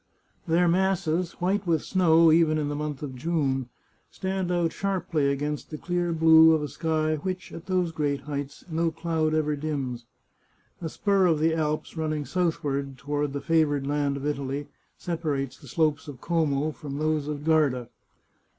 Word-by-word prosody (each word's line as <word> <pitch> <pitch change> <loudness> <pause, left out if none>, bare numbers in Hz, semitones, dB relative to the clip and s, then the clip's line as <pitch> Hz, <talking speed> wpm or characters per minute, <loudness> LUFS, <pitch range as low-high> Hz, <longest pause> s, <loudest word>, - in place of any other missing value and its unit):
Their 170 +2 +3
masses, 180 -1 +1
white 190 +2 -1
with 160 -3 +2
snow, 165 -3 +4
even 160 -1 +4
in 150 -1 -1
the 145 - -2
month 150 -1 -4
of 140 -3 -5
June, 135 -3 -1 0.4
stand 190 -1 -3
out 175 -2 +1
sharply 180 -7 0
against 145 +1 -3
the 155 - -6
clear 175 +1 -1
blue 160 0 +7
of 155 -1 +1
a - - -2
sky 155 0 0
which, 185 +4 -5
at 165 - -9
those 180 -3 +1
great 145 -3 -1
heights, 145 -1 -5
no 165 0 0
cloud 160 -1 -1
ever 150 -1 +1
dims. 135 -5 -4 0.7
A 165 - -3
spur 195 +1 +2
of 165 -3 +3
the 160 +2 +2
Alps 155 0 -2
running 155 -2 -2
southward 140 -6 -1
toward 145 +2 -2
the 140 0 -4
favoured 150 -4 +2
land 145 -1 0
of 140 - -6
Italy 140 -1 -3 0.3
separates 145 -6 -3
the 140 - -14
slopes 155 +2 0
of 140 -4 -8
Como 155 -2 0
from 140 -2 -7
those 155 -1 0
of 150 -1 -4
Garda. 145 -7 +2
155 Hz, 170 wpm, -26 LUFS, 145-165 Hz, 0.7 s, blue